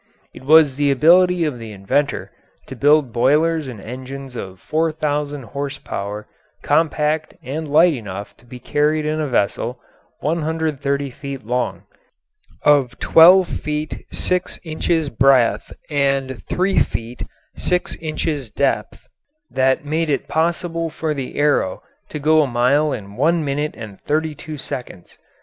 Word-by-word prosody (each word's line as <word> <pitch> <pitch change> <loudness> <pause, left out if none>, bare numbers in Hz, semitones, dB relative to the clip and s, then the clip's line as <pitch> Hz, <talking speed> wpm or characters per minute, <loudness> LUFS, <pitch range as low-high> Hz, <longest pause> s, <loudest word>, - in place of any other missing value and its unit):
It - - -12
was 150 -1 +5
the 145 -1 +2
ability 175 +5 +4
of 140 -6 -3
the 115 -1 -8
inventor 105 +9 -1 0.3
to 135 - -9
build 145 -1 +3
boilers 150 +5 +2
and 120 -5 -8
engines 130 +4 -8
of 95 -4 -7
4,000 150 -2 -1
horse 140 +3 -5
power 105 +2 -6 0.4
compact 155 -1 +1
and 150 +4 -5
light 165 +4 +5
enough 100 -5 -7
to 120 - -23
be 125 - -9
carried 150 +4 0
in 155 +1 -1
a 150 - -1
vessel 120 +1 -1 0.4
130 150 -3 -1
feet 140 -2 -8
long, 125 +1 -2 0.8
of 135 -4 +3
12 180 +3 +7
feet 150 -1 -4
6 180 0 0
inches 160 -1 -1
breadth, 130 -1 +3 0.2
and 135 -4 0
3 190 +2 +1
feet 115 +2 -3 0.3
6 180 0 0
inches 155 -4 -3
depth, 140 +7 -2 0.4
that 130 +3 +1
made 160 +2 -1
it 140 - -1
possible 165 0 -1
for 155 0 -3
the 135 -3 -6
Arrow 145 -10 +1 0.3
to - - -5
go 155 +2 +4
a 145 - +1
mile 130 +5 +2
in 100 -4 -6
one 160 +3 +2
minute 145 +2 -2
and 110 -4 -9
thirty 155 +1 -1
two 150 +1 -8
seconds. 125 -9 -8
145 Hz, 140 wpm, -20 LUFS, 130-155 Hz, 0.8 s, 12